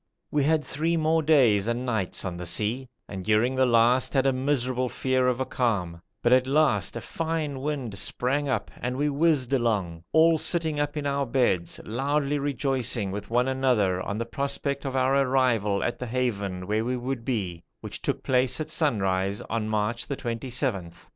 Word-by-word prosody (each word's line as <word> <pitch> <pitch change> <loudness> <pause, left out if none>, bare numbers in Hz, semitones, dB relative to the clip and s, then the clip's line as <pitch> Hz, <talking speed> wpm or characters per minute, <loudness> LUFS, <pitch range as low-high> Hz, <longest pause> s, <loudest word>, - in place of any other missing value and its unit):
We 145 -1 +2
had 155 0 +2
three 165 +4 -1
more 160 +1 +2
days 125 -10 +4
and 120 +2 -1
nights 110 -8 -2
on 90 -2 -3
the 90 0 -6
sea, 110 +8 -1 0.2
and 95 -2 -6
during 110 +5 +2
the 130 0 +3
last 120 +3 +3
had 135 0 +3
a 135 - +3
miserable 130 -1 0
fear 130 0 +1
of 125 0 +1
a 130 - 0
calm; 90 -11 -1 0.2
but 120 - +4
at 130 0 +4
last 150 +3 +2
a - - -5
fine 160 -4 -3
wind 130 -8 -3
sprang 140 +7 0
up 115 -6 -1
and 125 +1 -3
we 145 +1 +1
whizzed 145 -3 +2
along, 100 -10 0
all 160 0 +5
sitting 160 -3 0
up 145 +1 -1
in 145 - -3
our 140 -1 0
beds, 115 -9 0
loudly 140 +5 0
rejoicing 130 -7 -1
with 105 +1 -6
one 120 +2 +2
another 125 -9 +1
on 100 +3 -3
the 115 - -2
prospects 140 +2 -3
of 135 - -4
our 130 +1 +2
arrival 125 -7 +2
at 120 - -2
the 125 - -4
haven 100 -7 -2
where 105 +3 0
we 125 +2 -1
would 125 -1 -4
be, 95 -9 -3 0.2
which - - -6
took - - -2
place 130 0 +1
at 155 0 -4
sunrise 100 - 0
on 110 -1 -1
March 110 +2 -1
the 140 - -3
27th. 115 - -3
125 Hz, 185 wpm, -26 LUFS, 110-140 Hz, 0.2 s, all